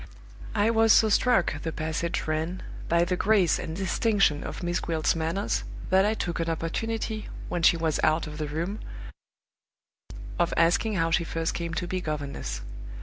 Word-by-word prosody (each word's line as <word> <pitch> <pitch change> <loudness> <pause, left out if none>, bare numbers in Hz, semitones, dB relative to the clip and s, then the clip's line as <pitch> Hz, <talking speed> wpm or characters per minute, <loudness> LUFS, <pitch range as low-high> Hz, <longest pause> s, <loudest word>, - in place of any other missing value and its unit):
"I 215 +2 +3
was 225 -1 +4
so 220 - +6
struck," 225 -3 +2
the 160 - -3
passage 160 +2 -2
ran, 160 +4 -2 0.3
"by 170 +1 +3
the 180 +1 0
grace 195 -2 +3
and 160 - -5
distinction 195 -4 +1
of - - -6
Miss 175 0 0
Gwilt's 160 -1 0
manners 165 +5 -1 0.3
that 190 +2 +5
I 215 - +1
took 175 -5 -3
an 165 0 -1
opportunity, 215 +7 -3 0.2
when 175 - -2
she 170 - +5
was 160 -2 0
out 155 +1 +2
of 150 0 -8
the 155 - -2
room, 170 +8 -3 1.6
of 175 -1 +1
asking 175 +6 +3
how 165 -2 +1
she 170 - +3
first 165 0 -2
came 170 -1 -4
to 180 - -2
be 185 +1 -3
governess. 140 - -4
170 Hz, 170 wpm, -27 LUFS, 160-195 Hz, 1.6 s, so